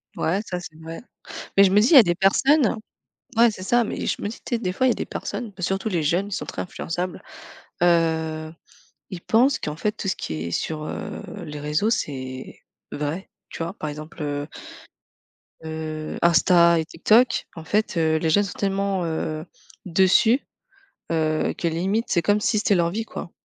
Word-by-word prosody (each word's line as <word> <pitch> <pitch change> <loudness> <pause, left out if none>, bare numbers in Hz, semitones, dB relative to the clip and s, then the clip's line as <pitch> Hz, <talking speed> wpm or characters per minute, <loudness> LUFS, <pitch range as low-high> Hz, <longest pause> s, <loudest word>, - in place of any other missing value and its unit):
Ouais, 185 +5 0
ça 180 -3 -4
c'est 165 -3 -10
vrai. 165 +1 -8 0.6
Mais 200 - +8
je 190 - +4
me 205 +2 +5
dis: 220 - +4
«il - - +8
y - - +10
a 260 - +12
des 175 -4 +1
personnes» 240 - +3 0.6
ouais, 235 0 +7
c'est 195 -3 -7
ça. 240 +5 +3
Mais - - -4
je - - -1
me - - -2
dis 215 - -7
tu 240 - -1
sais, - - -2
des 185 -5 -2
fois, 260 +7 +2
il - - +5
y - - +4
a - - +2
des - - -3
personnes, 230 -4 -5
bah 180 - -7
surtout 195 +4 -1
les 170 -5 0
jeunes, 175 +6 +1
ils - - -10
sont - - -3
très - - -5
influençables. 175 0 -4 0.6
Heu, 160 -2 +1 0.6
ils 185 -3 -6
pensent 250 +9 +3
qu'en 150 0 -4
fait, 210 +6 -1
tout 215 - -7
ce 190 - +1
qui - - -5
est 80 +2 -4
sur, 155 - -2
heu, - - -6 0.2
les 150 0 -7
réseaux, 150 +9 0
c'est 130 - -4 0.3
vrai, 150 +6 -3 0.2
tu - - -5
vois? 170 +4 -4
Par 155 - -5
exemple, 155 +2 -8
heu, 145 0 -2 1.2
heu, 155 -1 -5
Insta 170 0 +5
et - - -3
TikTok, 220 +10 +3
en 160 - -9
fait, 210 +3 0
heu, 160 -1 +2
les 160 0 0
jeunes 205 +6 +4
sont 200 - -5
tellement, 195 -2 0
heu, 160 -1 -3 0.4
dessus, 190 - +4 0.7
heu, 155 -1 +1
que 170 - -1
limite, 190 +8 0
c'est 170 - +2
comme 205 +4 +2
si 215 0 +2
c'était 205 -1 +2
leur 170 -1 +2
vie, 220 +4 -3
quoi. 185 -5 -7
175 Hz, 205 wpm, -23 LUFS, 160-205 Hz, 1.2 s, a